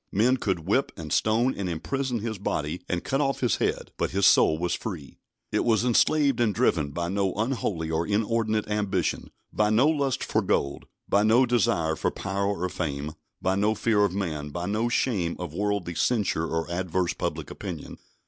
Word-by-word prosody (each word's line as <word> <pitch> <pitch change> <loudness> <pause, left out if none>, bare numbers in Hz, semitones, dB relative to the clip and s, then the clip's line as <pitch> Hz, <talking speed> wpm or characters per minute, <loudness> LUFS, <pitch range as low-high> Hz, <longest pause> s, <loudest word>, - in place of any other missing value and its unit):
Men 120 +6 +3
could 95 -9 -2
whip, 130 +9 +1
and 80 -2 -5
stone, 115 +4 +2
and 95 -2 -3
imprison 125 - -2
his 110 -2 -4
body, 75 -3 -2
and 90 -1 -1
cut 135 +2 0
off 135 -1 0
his 125 -4 +2
head, - - -1
but - - 0
his 100 +1 +1
soul 80 - +5
was 90 +1 -1
free. 85 -10 -6 0.3
It - - +1
was 115 0 +2
enslaved 140 +2 +3
and 110 -5 +2
driven 75 -5 +2
by 85 +4 -3
no 95 0 0
unholy 105 -8 -1
or 80 +1 0
inordinate 110 +1 0
ambition, 105 -4 -1 0.2
by 105 0 +2
no 115 +7 +4
lust 140 -4 0
for - - +1
gold, 70 0 -1 0.2
by 100 - +3
no 115 +5 +5
desire 85 -9 +1
for - - 0
power 100 0 -2 0.2
or - - +2
fame, 75 -4 -3 0.3
by 95 - +2
no 105 +3 +2
fear 105 -1 +2
of 100 -2 0
man, 80 -7 -3
by 85 +4 -4
no 110 +5 0
shame 100 -9 0
of 90 -4 -6
worldly 100 -2 -1
censure 100 -5 +1
or 80 0 -2
adverse 90 0 -1
public - - -4
opinion. - - -7
100 Hz, 185 wpm, -26 LUFS, 85-115 Hz, 0.3 s, soul